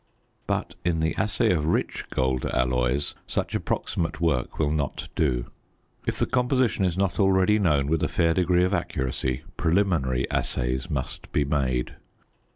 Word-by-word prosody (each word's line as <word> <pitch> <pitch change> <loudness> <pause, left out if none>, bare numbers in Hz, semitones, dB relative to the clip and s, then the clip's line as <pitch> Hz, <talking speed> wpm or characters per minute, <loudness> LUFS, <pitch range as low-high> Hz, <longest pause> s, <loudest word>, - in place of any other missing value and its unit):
But - - -1
in 85 -2 +1
the 80 +1 +1
assay 105 -3 +2
of 75 -4 0
rich 85 - 0
gold 65 -1 0
alloys 60 +3 +1
such - - -2
approximate 85 - -2
work 75 -7 0
will 75 -2 +1
not 75 -3 -2
do. 60 -6 0 0.6
If - - 0
the - - +2
composition 125 -5 +1
is 90 -1 0
not 95 -3 0
already 95 +1 +4
known 75 -8 +2
with 80 +2 0
a - - +2
fair 85 -1 +2
degree 90 0 +3
of 95 +2 +1
accuracy 65 -6 -2
preliminary 80 -8 +1
assays 65 +1 -1
must 65 -3 -4
be 75 - +1
made. 65 -4 -1
80 Hz, 155 wpm, -26 LUFS, 65-90 Hz, 0.6 s, already